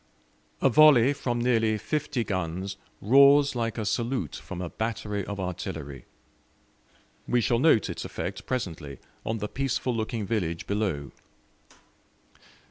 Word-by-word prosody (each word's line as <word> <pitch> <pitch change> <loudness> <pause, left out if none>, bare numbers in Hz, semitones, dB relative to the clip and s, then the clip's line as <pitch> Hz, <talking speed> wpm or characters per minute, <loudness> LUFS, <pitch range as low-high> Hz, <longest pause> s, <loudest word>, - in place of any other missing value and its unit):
A - - +6
volley 140 -1 +6
from 120 -4 -2
nearly 115 -3 +2
fifty 135 +2 -2
guns 95 0 -3 0.3
roars 140 +4 +6
like 115 -1 -2
a 110 - -2
salute 120 +4 -1
from 90 - -8
a 90 -2 -5
battery 105 -2 -3
of 100 +1 -6
artillery: 70 -7 -5 1.2
we 125 - +2
shall 120 0 +1
note 140 -6 +4
its - - -5
effect - - -6
presently 80 - -4 0.3
on 110 - -2
the 105 0 -3
peaceful 130 0 -1
looking 110 -1 -2
village 90 -6 -2
below. 95 -10 -2
110 Hz, 125 wpm, -27 LUFS, 95-125 Hz, 1.2 s, A